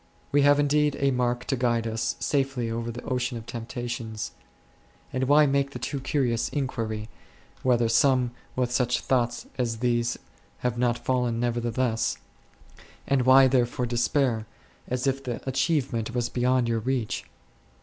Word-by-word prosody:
We 145 Hz, -, +4 dB
have 145 Hz, +1 st, +5 dB
indeed 145 Hz, 0 st, +2 dB
a 140 Hz, 0 st, +3 dB
mark 125 Hz, -1 st, 0 dB
to 135 Hz, -, 0 dB
guide 120 Hz, -2 st, +1 dB
us 115 Hz, 0 st, -1 dB
safely 135 Hz, -5 st, 0 dB
over 115 Hz, +1 st, -3 dB
the 120 Hz, +1 st, -6 dB
ocean 125 Hz, -1 st, -2 dB
of 115 Hz, -, -9 dB
temptations; 120 Hz, -2 st, -5 dB, 0.8 s
and 130 Hz, 0 st, 0 dB
why 150 Hz, +3 st, +6 dB
make 140 Hz, 0 st, +1 dB
the -, -, -4 dB
too 140 Hz, -, -3 dB
curious 130 Hz, -4 st, 0 dB
inquiry, 115 Hz, -6 st, -3 dB, 0.5 s
whether 120 Hz, -2 st, +3 dB
some 125 Hz, +1 st, +3 dB, 0.2 s
with 125 Hz, -1 st, 0 dB
such 125 Hz, 0 st, +1 dB
thoughts 120 Hz, -2 st, 0 dB
as 115 Hz, -2 st, 0 dB
these 120 Hz, 0 st, 0 dB, 0.4 s
have 125 Hz, -1 st, 0 dB
not 120 Hz, -1 st, +1 dB
fallen 125 Hz, -3 st, 0 dB
nevertheless, 120 Hz, 0 st, 0 dB, 0.9 s
and 130 Hz, -2 st, +1 dB
why 135 Hz, +1 st, +8 dB
therefore 125 Hz, -1 st, +1 dB
despair, 120 Hz, -1 st, +1 dB, 0.4 s
as 125 Hz, +1 st, -2 dB
if 135 Hz, 0 st, 0 dB
the 125 Hz, 0 st, -5 dB
achievement 130 Hz, -4 st, 0 dB
was 120 Hz, -1 st, 0 dB
be 120 Hz, -, -3 dB
yond 125 Hz, -1 st, +3 dB
your 115 Hz, -1 st, +1 dB
reach 120 Hz, -1 st, -2 dB
125 Hz, 150 wpm, -26 LUFS, 115-130 Hz, 0.9 s, why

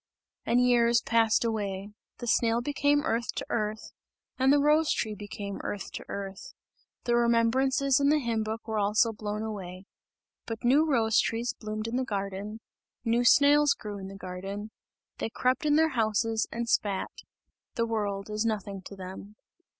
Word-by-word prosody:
And 235 Hz, +2 st, +3 dB
years 235 Hz, -1 st, +4 dB
passed 230 Hz, 0 st, +2 dB
away. 205 Hz, -3 st, -3 dB, 0.3 s
The 240 Hz, -, -6 dB
snail 230 Hz, 0 st, +2 dB
became 290 Hz, +2 st, +1 dB
earth 235 Hz, -3 st, -1 dB
to -, -, -3 dB
earth 215 Hz, -1 st, -2 dB, 0.5 s
and 265 Hz, +1 st, +4 dB
the 290 Hz, -, +6 dB
rose 300 Hz, +2 st, +3 dB
tree 215 Hz, -2 st, -1 dB
became 205 Hz, -1 st, -6 dB
earth 205 Hz, -, -5 dB
to -, -, -6 dB
earth; 195 Hz, -1 st, -7 dB, 0.5 s
the 240 Hz, -, +1 dB
remembrances 255 Hz, +4 st, +3 dB
in 280 Hz, 0 st, +3 dB
the 305 Hz, -, +4 dB
hymn 235 Hz, -5 st, -1 dB
book 220 Hz, +1 st, -5 dB
were 220 Hz, -1 st, -1 dB
also 215 Hz, +3 st, +2 dB
blown 210 Hz, 0 st, -4 dB
away 190 Hz, -4 st, -6 dB, 0.6 s
but 225 Hz, -1 st, -5 dB
new 290 Hz, +6 st, +4 dB
rose 225 Hz, -5 st, +3 dB
trees 235 Hz, +2 st, 0 dB
bloomed 215 Hz, -1 st, -5 dB
in 235 Hz, +2 st, -2 dB
the 260 Hz, -, +1 dB
garden, 200 Hz, -1 st, -4 dB, 0.4 s
new 235 Hz, +1 st, +2 dB
snails 290 Hz, +3 st, +5 dB
grew 205 Hz, -2 st, -7 dB
in 190 Hz, -, -7 dB
the 195 Hz, -, -9 dB
garden; 195 Hz, +3 st, -6 dB, 0.5 s
they -, -, -2 dB
crept 255 Hz, +7 st, 0 dB
in 295 Hz, -, +4 dB
their 320 Hz, +1 st, +4 dB
houses 225 Hz, -3 st, 0 dB
and 235 Hz, 0 st, -3 dB
spat. 200 Hz, -4 st, 0 dB, 0.6 s
The 230 Hz, -, +1 dB
world 205 Hz, -3 st, -2 dB
is 215 Hz, 0 st, -2 dB
nothing 205 Hz, -3 st, -2 dB
to 200 Hz, -, -9 dB
them. 190 Hz, +2 st, -9 dB
225 Hz, 165 wpm, -28 LUFS, 205-245 Hz, 0.6 s, the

